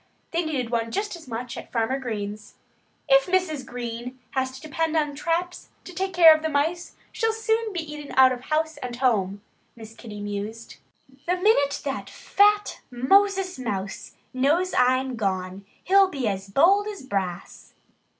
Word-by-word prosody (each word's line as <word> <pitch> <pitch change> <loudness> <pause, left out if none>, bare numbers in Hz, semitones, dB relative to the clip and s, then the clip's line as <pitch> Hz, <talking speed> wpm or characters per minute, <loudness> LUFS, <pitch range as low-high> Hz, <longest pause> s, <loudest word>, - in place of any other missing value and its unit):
They 340 +1 0
needed 265 -7 -3
one 230 -1 0
just 410 - -3
as 330 -5 -13
much 240 0 -5
at - - -9
Farmer 235 +3 0
Green's. 210 -4 -6 0.5
"If 275 -1 +5
Mrs. 360 -6 0
Green 245 0 -6
has 265 -1 0
to 260 - -10
depend 320 +2 -2
on 295 -2 0
traps 340 +4 -2
to 365 - -10
take 380 +2 -2
care 330 -3 +9
of 310 - -4
the 315 - -1
mice 320 +4 -1 0.2
she'll 450 -1 0
soon 445 0 0
be 355 -3 -3
eaten 295 -1 -8
out 260 0 +7
of 250 0 -5
house 315 0 -1
and 250 -4 -6
home," 205 -6 0 0.3
Miss 220 -1 -11
Kitty 220 -2 -10
mused. 205 +3 -6 0.5
"The 360 - +2
minute 360 -7 +2
that 275 -1 -4
fat 415 +1 +2
Moses 380 +8 +2
Mouse 200 -5 -5 0.2
knows 305 +8 +1
I'm 255 0 +2
gone 190 -1 -3 0.2
he'll 390 +1 +5
be 275 -10 -3
as 195 -1 -3
bold 390 - +4
as 410 -8 -7
brass." 190 -7 -5
270 Hz, 165 wpm, -25 LUFS, 230-350 Hz, 0.5 s, care